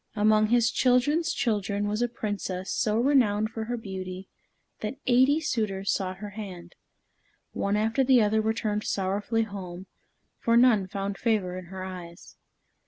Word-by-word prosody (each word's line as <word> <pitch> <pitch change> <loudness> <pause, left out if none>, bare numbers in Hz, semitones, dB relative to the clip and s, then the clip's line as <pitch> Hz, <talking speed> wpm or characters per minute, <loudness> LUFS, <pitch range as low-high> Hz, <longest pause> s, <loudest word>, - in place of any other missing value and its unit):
Among 215 +1 +4
his 235 0 +3
children's 280 +6 +2
children 205 -3 -1
was 210 +2 -1
a 240 - +2
Princess 205 -5 -4
so 215 0 +1
renowned 230 -5 +2
for 225 -1 -4
her 240 +2 -3
beauty 190 -3 -7 0.5
that 215 +5 -4
eighty 260 +4 +4
suitors 215 -10 -1
sought 185 -2 -3
her 205 +1 -7
hand. 185 -5 -8 0.8
One 200 +1 -1
after 225 +5 +1
the 260 -1 +5
other 215 +1 +2
returned 215 -1 -1
sorrowfully 205 +4 -1
home, 190 -3 -7 0.5
for 230 0 +3
none 235 -6 +5
found 195 0 -4
favor 210 -6 0
in 185 0 -7
her 185 +2 -7
eyes. 180 -2 -9
210 Hz, 150 wpm, -27 LUFS, 190-230 Hz, 0.8 s, the